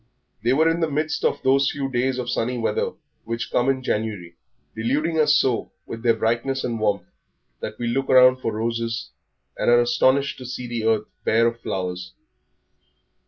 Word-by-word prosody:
They 120 - +2
were 160 +4 +3
in 165 +1 +1
the 165 -2 +1
midst 155 +2 -2
of - - 0
those 135 +1 +3
few 140 -1 -3
days 130 0 0
of 125 -1 -3
sunny 125 0 -1
weather 115 - -1 0.3
which 115 +1 -4
come 125 +2 +2
in 130 -1 0
January, 105 -8 -3 0.4
deluding 145 +9 0
us 150 -1 +5
so 130 -5 +1
with 115 - -7
their 115 -1 +3
brightness 120 +4 -1
and 115 -2 -2
warmth 105 -2 0 0.5
that 110 - -6
we 120 - -4
look 135 +3 -1
round 130 0 +6
for 115 - -1
roses 115 +1 -3 0.5
and - - +2
are 120 0 +6
astonished 130 +4 +2
to 130 - -8
see 125 0 -5
the 120 -2 -3
earth 110 -1 +2 0.2
bare 115 +1 +3
of 115 0 0
flowers. 90 -3 -4
120 Hz, 180 wpm, -23 LUFS, 115-135 Hz, 0.5 s, round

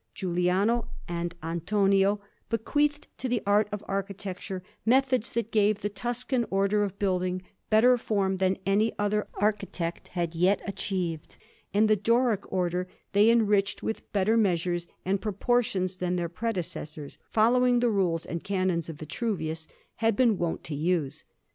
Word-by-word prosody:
Giuliano 185 +6 +1 0.2
and 170 0 -3
Antonio 195 +4 +2 0.3
bequeathed 290 +6 0
to 260 - -2
the 240 -2 0
art 205 +1 +3
of 210 0 -4
architecture 195 -1 -4 0.2
methods 255 0 +2
that 230 -1 -2
gave 210 -1 +2
the 205 - -1
Tuscan 240 +3 -1
Order 200 +2 +2
of 200 -1 -2
building 185 -2 0 0.3
better 245 +3 +5
form 195 -4 0
than 190 0 +1
any 210 +3 +2
other 205 0 0
architect 200 -5 -2
had 170 -2 -2
yet 180 +4 +3
achieved, 185 -5 -3 0.3
and 210 +3 +4
the 215 - +5
Doric 230 0 +1
Order 180 -1 0 0.2
they 205 +3 +5
enriched 210 -4 +2
with 220 - -4
better 210 +3 +2
measures 175 -4 +1 0.2
and 195 +1 0
proportions 205 -4 0
than 180 0 -1
their 170 -1 -1
predecessors, 170 -7 -4
following 245 +2 +4
the 240 -1 +2
rules 180 -5 +1
and 170 - -5
canons 185 -4 0
of 165 - -5
Vitruvius, 160 -1 -3 0.3
had 225 -1 +2
been 235 -1 +4
wont 170 -1 -2
to 160 - -6
use. 155 -1 -1
195 Hz, 145 wpm, -28 LUFS, 180-220 Hz, 0.3 s, better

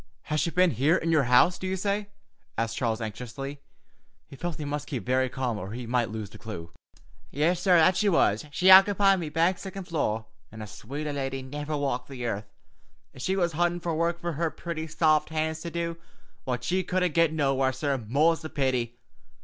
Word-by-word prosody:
'" - - -41
"Has 155 - +2
she 170 - +1
been 180 +1 +3
here 150 +6 +3
in 165 -2 0
your 150 -5 +3
house, 125 +9 +4
do 185 - -4
you 190 - -1
say?" 200 +2 -1 0.5
asked 115 0 -1
Charles 115 -2 -1
anxiously. 125 +6 -6 0.6
He - - -13
felt 175 +3 -4
he 150 - -5
must 145 0 -4
keep 130 -6 -4
very 130 +1 +1
calm 125 -5 -2
or 95 +2 -6
he 120 +1 -5
might 120 -1 0
lose 110 -2 -6
the - - -12
clue. 85 -7 -7 0.6
"Yis, 165 +5 +1
sorr, 180 -1 +4
that 170 +3 +5
she 210 +1 +3
was. 110 - +3
She 185 +6 +4
ockepied 195 0 +7
me 160 -3 -4
back 165 +4 +1
siccond 190 -1 -7
floor, 110 -9 -1 0.3
an' 110 0 -8
a - - -6
swater 145 +9 -6
lady 135 -1 -3
niver 145 +3 -4
walked 135 -3 -2
the 125 -3 -6
earth, 105 -2 -3 0.7
ef 130 - -11
she 190 +8 0
was 175 -3 +1
huntin' 175 +2 0 0.2
work 170 +1 0
fer 170 0 -3
her 165 +2 -1
pretty, 160 -1 -5
saft 155 -1 +2
hands 160 0 -1
to 170 - -5
do, 170 0 -3 0.5
what 125 -1 -2
she 185 +8 0
couldn't 180 -2 0
get 165 -1 +4
nowhere, 135 -4 +1
sorr, 135 0 -1
more's 145 +9 +2
the 155 - -6
pity. 125 -5 -1
150 Hz, 205 wpm, -27 LUFS, 125-170 Hz, 0.7 s, ockepied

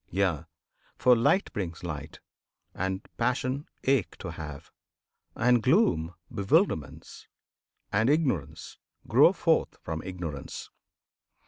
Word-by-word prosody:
Yea! 90 -5 0 0.5
For 125 -1 +5
Light 120 +12 +2
brings 85 -5 -4
light, 75 -3 -6 0.5
and 95 +1 -3
Passion 130 +3 -1 0.2
ache 130 -11 +1
to - - -6
have; 75 -2 -8 0.6
And 120 0 +3
gloom, 125 - +2 0.2
bewilderments, 100 - 0 0.6
and 110 +5 +2
ignorance 95 - -1 0.3
Grow - - +6
forth - - +1
from 80 0 -4
Ignorance. 85 -7 -6
95 Hz, 100 wpm, -28 LUFS, 80-125 Hz, 0.6 s, Grow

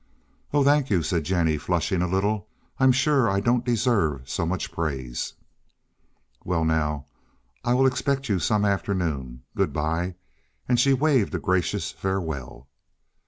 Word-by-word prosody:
"Oh, 145 -1 +3
thank 145 -1 +3
you," 90 -6 +2
said 85 -4 -1
Jennie 80 -4 +1
flushing 90 +2 0
a 90 - +1
little. 95 +2 0 0.3
"I'm 130 0 +6
sure 135 -1 +3
I 100 0 +1
don't 120 +3 +1
deserve 105 - +1
so 80 - -2
much 90 +2 -2
praise." 65 -7 -3 1.1
"Well, 85 -3 0
now 75 -3 0 0.6
I 120 - +2
will 135 +1 +4
expect 135 +1 0
you 100 -5 +1
some 105 +3 +1
afternoon. 85 -11 -2
Good - - +1
by," 80 +4 -1 0.5
and 125 -1 +2
she 135 +3 +4
waved 135 -7 +2
a - - -1
gracious 90 0 0
farewell. 80 -9 -4
95 Hz, 145 wpm, -25 LUFS, 80-120 Hz, 1.1 s, I'm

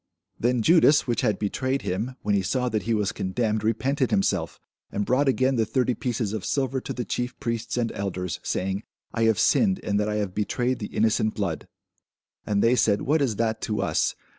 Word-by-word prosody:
Then 120 -1 +1
Judas, 155 0 +5
which 120 -2 0
had 110 -5 +1
betrayed 130 +6 -1
him, 110 +8 -2
when 105 - +1
he 100 - +3
saw 125 +7 0
that 110 -2 -1
he 115 - -1
was 105 -2 0
condemned, 110 +2 -1
repented 130 +5 +1
himself, 100 - 0 0.3
and 105 - -1
brought 130 +5 +2
again 130 0 +2
the 115 - +3
thirty 125 0 +1
pieces 115 -4 -2
of 110 -4 -3
silver 135 -2 -1
to - - -6
the 125 - -3
chief 125 0 -3
priests 115 0 -3
and 115 -2 0
elders, 90 -3 -3
saying, 95 +2 -2 0.3
I 115 -1 +1
have 110 -2 +3
sinned 195 - +3
in 105 - -2
that 105 0 0
I 105 - -1
have 105 -3 -2
betrayed 120 +5 -1
the 105 - -4
innocent 110 0 +1
blood. - - -3 0.8
And 100 -1 +1
they 115 +2 +4
said, 105 -4 +2
What 150 +3 +2
is 125 -6 +1
that 110 0 -1
to 105 -1 -1
us? - - +1
115 Hz, 205 wpm, -25 LUFS, 105-130 Hz, 0.8 s, Judas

